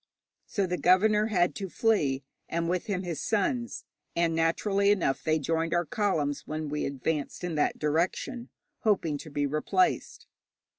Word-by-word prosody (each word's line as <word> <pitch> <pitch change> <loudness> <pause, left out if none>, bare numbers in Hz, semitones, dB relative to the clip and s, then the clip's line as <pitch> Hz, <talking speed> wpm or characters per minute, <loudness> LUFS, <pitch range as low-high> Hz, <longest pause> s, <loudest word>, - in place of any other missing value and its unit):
So 200 - 0
the 180 -1 -2
governor 210 +4 +4
had 180 -5 +2
to 195 -2 -5
flee, 150 - +1 0.3
and 170 0 -1
with 180 +4 -1
him 190 -3 -1
his 170 -5 -4
sons, 235 +3 -1 0.3
and 170 -1 +2
naturally 195 +5 +2
enough 185 -10 +1
they 155 0 +2
joined 165 +3 0
our 175 0 +1
columns 160 -11 -1
when 155 0 -3
we 150 +1 -2
advanced 140 +4 -3
in 175 -1 -2
that 150 - +1
direction, 175 - -1 0.3
hoping 170 -9 +1
to 155 - -9
be 145 0 -1
replaced. 155 - 0
170 Hz, 155 wpm, -28 LUFS, 155-200 Hz, 0.3 s, governor